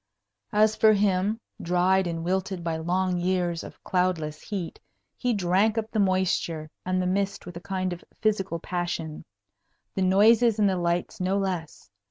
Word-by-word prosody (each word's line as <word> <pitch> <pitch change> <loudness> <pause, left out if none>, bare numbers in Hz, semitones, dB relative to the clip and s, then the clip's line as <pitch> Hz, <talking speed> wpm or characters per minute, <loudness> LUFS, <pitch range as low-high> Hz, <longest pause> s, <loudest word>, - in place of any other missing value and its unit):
As 215 0 +4
for 220 -1 +5
him, 200 +1 +1 0.2
dried 180 +2 +2
and 165 -1 -3
wilted 190 0 -1
by 165 -1 -1
long 180 +2 0
years 175 -2 0
of - - -12
cloudless 175 -5 -1
heat, 195 -6 -5 0.4
he 250 - -1
drank 200 +2 +2
up 220 0 -2
the 220 - -1
moisture 185 -5 0
and 185 0 0
the 180 - 0
mist 195 +2 -1
with 175 -1 -9
a 170 - -7
kind 185 -1 -2
of 175 - -10 0.2
physical 195 -5 0
passion 170 -2 -4 0.7
the 190 - -2
noises 215 +4 +5
and 210 -2 +4
the 190 - +1
lights 175 0 -1
no 185 +2 +1
less. 180 - -4
185 Hz, 165 wpm, -26 LUFS, 175-200 Hz, 0.7 s, for